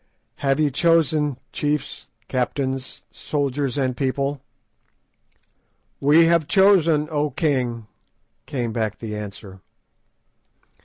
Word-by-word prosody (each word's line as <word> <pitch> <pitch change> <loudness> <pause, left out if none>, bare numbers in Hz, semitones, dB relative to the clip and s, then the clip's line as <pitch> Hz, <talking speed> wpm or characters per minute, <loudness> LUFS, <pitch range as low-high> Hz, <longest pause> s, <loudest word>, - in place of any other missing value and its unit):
Have 135 +1 0
ye 150 -2 +2
chosen, 155 -2 +2 0.2
chiefs, 150 -1 -2 0.2
captains, 130 +1 -3
soldiers, 140 -2 -2
and 130 -3 0
people?" 140 +1 -1 1.6
"We 150 +4 +5
have 165 -2 +3
chosen, 170 -6 +4
O 150 0 0
king," 125 -8 -1 0.6
came 120 -4 -3
back 110 -2 -2
the 110 -2 -6
answer. 100 -2 -8
140 Hz, 95 wpm, -22 LUFS, 125-150 Hz, 1.6 s, We